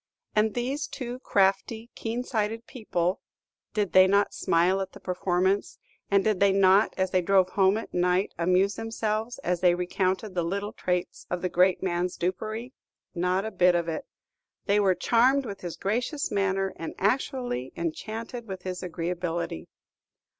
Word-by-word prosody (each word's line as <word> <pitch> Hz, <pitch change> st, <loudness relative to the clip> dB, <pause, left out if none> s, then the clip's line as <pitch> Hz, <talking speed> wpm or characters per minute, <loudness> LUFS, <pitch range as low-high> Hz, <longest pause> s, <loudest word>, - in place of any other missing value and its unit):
And 215 Hz, 0 st, +2 dB
these 260 Hz, +5 st, -2 dB
two 250 Hz, -1 st, -6 dB
crafty, 205 Hz, +2 st, +1 dB
keen 235 Hz, +2 st, -3 dB
sighted 225 Hz, -1 st, -2 dB
people, 185 Hz, -8 st, -2 dB, 0.5 s
did 205 Hz, -4 st, 0 dB
they 185 Hz, 0 st, +8 dB
not 200 Hz, +1 st, +2 dB
smile 180 Hz, +3 st, +2 dB
at 190 Hz, -, -5 dB
the -, -, -11 dB
performance, 185 Hz, +2 st, 0 dB, 0.3 s
and 200 Hz, -1 st, +3 dB
did 215 Hz, -3 st, +1 dB
they 200 Hz, -1 st, +5 dB
not, 195 Hz, +1 st, +4 dB
as 190 Hz, -1 st, 0 dB
they 185 Hz, -, +3 dB
drove 185 Hz, 0 st, +3 dB
home 195 Hz, +1 st, +3 dB
at 225 Hz, -, -7 dB
night, 180 Hz, +2 st, +1 dB
amuse 185 Hz, +3 st, +2 dB
themselves 225 Hz, +1 st, -3 dB
as 175 Hz, 0 st, 0 dB
they 175 Hz, -1 st, +5 dB
recounted 185 Hz, +3 st, -1 dB
the 175 Hz, -, 0 dB
little 200 Hz, +5 st, -3 dB
traits 180 Hz, -1 st, -3 dB
of 180 Hz, 0 st, -3 dB
the 180 Hz, -, +1 dB
great 180 Hz, +2 st, +3 dB
man's 180 Hz, -1 st, -1 dB
dupery? 215 Hz, +7 st, -3 dB, 0.4 s
Not 180 Hz, +2 st, 0 dB
a 220 Hz, -, -3 dB
bit 180 Hz, -3 st, +4 dB
of 170 Hz, -1 st, 0 dB
it. 160 Hz, -1 st, -4 dB, 0.6 s
They 205 Hz, 0 st, +3 dB
were 190 Hz, -3 st, +3 dB
charmed 250 Hz, +8 st, +3 dB
with 200 Hz, -3 st, -7 dB
his 175 Hz, -2 st, -6 dB
gracious 245 Hz, +8 st, -1 dB
manner, 195 Hz, -1 st, 0 dB
and 165 Hz, -, -6 dB
actually 245 Hz, -, -1 dB
enchanted 225 Hz, +8 st, -5 dB
with 190 Hz, -2 st, -7 dB
his 185 Hz, -1 st, -4 dB
agreeability. 170 Hz, -, -3 dB
195 Hz, 160 wpm, -27 LUFS, 180-220 Hz, 0.6 s, they